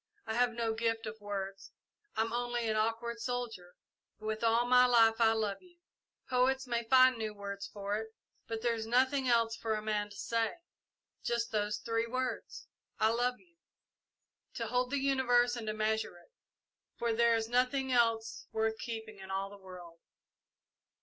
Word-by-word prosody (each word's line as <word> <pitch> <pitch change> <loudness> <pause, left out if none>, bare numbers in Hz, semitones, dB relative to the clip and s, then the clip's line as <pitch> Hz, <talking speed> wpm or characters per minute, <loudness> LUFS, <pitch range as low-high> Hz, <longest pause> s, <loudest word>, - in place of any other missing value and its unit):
I 220 - -3
have 245 +1 +2
no 230 -1 -1
gift 225 0 -1
of 215 0 -7
words 195 -1 -5 0.4
I'm 225 +1 0
only 240 -1 -1
an 215 - +1
awkward 230 +2 -1
soldier, 230 -7 -4 0.4
but 215 - -11
with 220 +1 -2
all 230 +1 +3
my 250 0 +6
life 225 -2 +5
I 225 -1 +6
love 215 -3 -1
you. 355 -1 -21 0.5
Poets 260 +1 +2
may 235 -2 -1
find 255 +1 +6
new 215 -1 -3
words 200 -1 -6
for 205 0 -3
it, 220 0 -4 0.4
but 225 0 -4
there 240 -1 +2
is 225 -1 -4
nothing 260 +3 +2
else 230 -2 +3
for 225 -1 -2
a 215 - -3
man 210 -1 -1
to 205 - -12
say. 230 +1 0 0.7
Just 235 0 -1
those 210 -1 0
three 230 0 -1
words, 255 +2 -4 0.3
'I 220 - +3
love 245 +2 0
you,' 340 -2 -27 1.0
to - - -2
hold 250 0 0
the 285 - 0
universe 250 -3 +3
and 230 -2 -6
to 215 - 0
measure 215 -3 -1
it, 175 - -21 0.7
for 235 -1 0
there 235 0 +4
is 225 -1 -1
nothing 255 +2 +1
else 230 -2 +1
worth 220 0 0
keeping 220 -3 -6
in 190 0 -10
all 195 +1 -2
the 200 -1 -13
world!" 175 -3 -11
230 Hz, 175 wpm, -32 LUFS, 215-245 Hz, 1.0 s, my